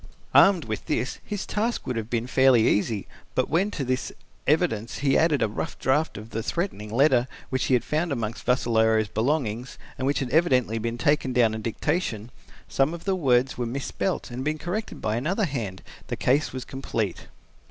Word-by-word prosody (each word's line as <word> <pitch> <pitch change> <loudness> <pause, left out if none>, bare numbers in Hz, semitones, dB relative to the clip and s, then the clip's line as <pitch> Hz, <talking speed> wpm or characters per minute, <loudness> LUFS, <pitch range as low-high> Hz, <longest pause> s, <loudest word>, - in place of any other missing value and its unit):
Armed 190 -6 +6
with 110 -2 -5
this, 125 - -1
his 205 -2 -4
task 225 +3 -1
would 125 - -2
have 115 -1 -4
been 115 -1 -1
fairly 130 -3 +4
easy, 105 -1 +1 0.3
but 130 - 0
when 180 +6 +2
to 150 - -3
this 130 0 -1 0.4
evidence 140 -8 +1
he 135 - +4
added 155 -6 +3
a - - +3
rough 105 - -5
draft 150 +5 +1
of 110 +1 -9
the 115 - -2
threatening 110 - -3
letter 130 0 +4 0.2
which 130 - 0
he 130 - +3
had 120 - +1
found 155 +4 -1
amongst 115 -3 -3
Vassalaro's 110 -3 +3
belongings, 125 -2 -1 0.2
and 130 - 0
which 140 - +1
had 130 -3 -2
evidently 130 -8 +3
been 115 +1 -3
taken 135 0 +1
down 120 -3 +4
at 110 - -4
dictation, 115 - -2 0.3
since - - -19
some 135 +5 +2
of 170 - -10
the 195 -1 +1
words 130 -6 +2
were 120 - -1
misspelt 140 +6 -3
and 120 - -5
had 130 - -4
been 155 +1 0
corrected 190 +7 -4
by 110 +1 0
another 190 - 0
hand, 115 - -4 0.2
the - - -2
case 140 +4 +1
was 130 -1 -6
complete. 115 -7 -3
130 Hz, 195 wpm, -25 LUFS, 115-150 Hz, 0.4 s, Armed